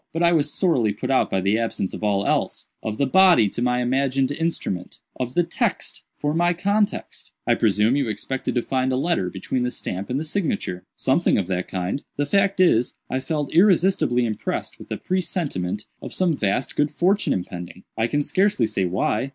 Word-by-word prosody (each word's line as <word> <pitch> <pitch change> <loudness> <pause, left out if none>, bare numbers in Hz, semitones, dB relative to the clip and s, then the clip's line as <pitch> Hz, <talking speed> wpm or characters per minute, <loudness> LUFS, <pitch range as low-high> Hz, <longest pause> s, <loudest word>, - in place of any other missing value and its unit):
But 165 +2 0
I 170 - +5
was 150 -3 +2
sorely 130 - +2
put 105 - -3
out 130 - +3
by 95 - 0
the 100 +4 +2
absence 115 -4 -2
of - - -7
all 100 -1 +1
else—of 110 -1 -2
the 140 - +2
body 180 - +6
to 120 - -5
my 125 0 +1
imagined 135 +1 +1
instrument—of 130 - -4
the 175 - +4
text - - -2 0.2
for 150 0 -1
my 175 +2 +2
context." 200 +4 -1
"I - - +4
presume 105 +5 +2
you 140 -5 0
expected 130 +7 -3
to 120 - +1
find 130 0 0
a - - +1
letter 135 - 0
between 100 +7 -3
the 125 - 0
stamp 95 -5 -5
and 130 +2 0
the - - -3
signature." 155 - -2
"Something 135 +7 +2
of 100 - 0
that 90 -1 -1
kind. 95 +8 -3 0.2
The 145 - +1
fact 195 +4 +2
is, 125 -10 +3 0.2
I 130 - 0
felt 145 +1 -3
irresistibly 175 -9 +4
impressed 110 -2 -3
with - - -12
a - - -1
presentiment 145 - -2 0.2
of - - -7
some 180 -4 +2
vast 105 +2 -1
good 150 0 +2
fortune 185 +7 +1
impending. 90 0 -5
I 115 - +1
can 145 +3 0
scarcely 200 - +2
say 95 -3 -1
why. 100 +8 0
130 Hz, 190 wpm, -23 LUFS, 105-170 Hz, 0.2 s, body